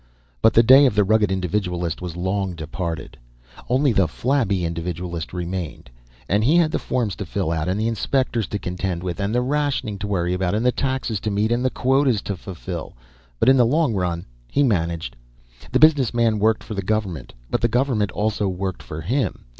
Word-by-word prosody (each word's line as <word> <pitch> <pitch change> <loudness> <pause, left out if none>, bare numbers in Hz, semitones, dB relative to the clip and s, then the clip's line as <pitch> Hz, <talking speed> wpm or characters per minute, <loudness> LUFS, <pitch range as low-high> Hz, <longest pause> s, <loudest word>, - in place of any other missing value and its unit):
But 110 - +4
the 115 - +7
day 135 +4 +8
of 115 - -1
the 105 - +4
rugged 105 0 +2
individualist 90 -3 -2
was 90 -2 -6
long 95 0 -1
departed; 80 -1 -5 0.5
only 130 +1 +3
the 95 -4 +3
flabby 105 - 0
individualist 85 0 -4
remained. 90 -6 -5 0.4
And 105 +3 +2
he 145 +8 +4
had 165 -3 +3
the - - -1
forms 115 -6 -1
to - - -4
fill 95 -2 -2
out 80 0 -1
and 95 +3 0
the 110 - 0
inspectors 115 -1 0
to 105 - -3
contend 90 -2 -3
with, 90 0 -4
and 100 +3 -1
the 125 - +3
rationing 140 -7 -1
to 105 - -3
worry 90 -3 0
about 90 +1 0
and 110 +3 0
the 125 - +5
taxes 130 -5 -2
to 110 - -2
meet 105 +2 0
and 120 +1 +1
the 130 - +2
quotas 130 -4 +1
to 100 - -3
fulfill. 90 -2 -7 0.5
But - - +2
in 135 0 +7
the 125 - +6
long 150 -1 +2
run, 90 -3 -2 0.2
he 145 - +1
managed. 85 - -1 0.6
The - - +3
business 145 -7 +4
man 115 -3 +2
worked 110 +1 +2
for - - -7
the 100 - -2
government, 95 - -3 0.2
but - - 0
the 120 - +3
government 120 -3 +1
also 105 0 -1
worked 95 0 -3
for 75 - -7
him. 125 - -2
100 Hz, 200 wpm, -22 LUFS, 90-120 Hz, 0.6 s, day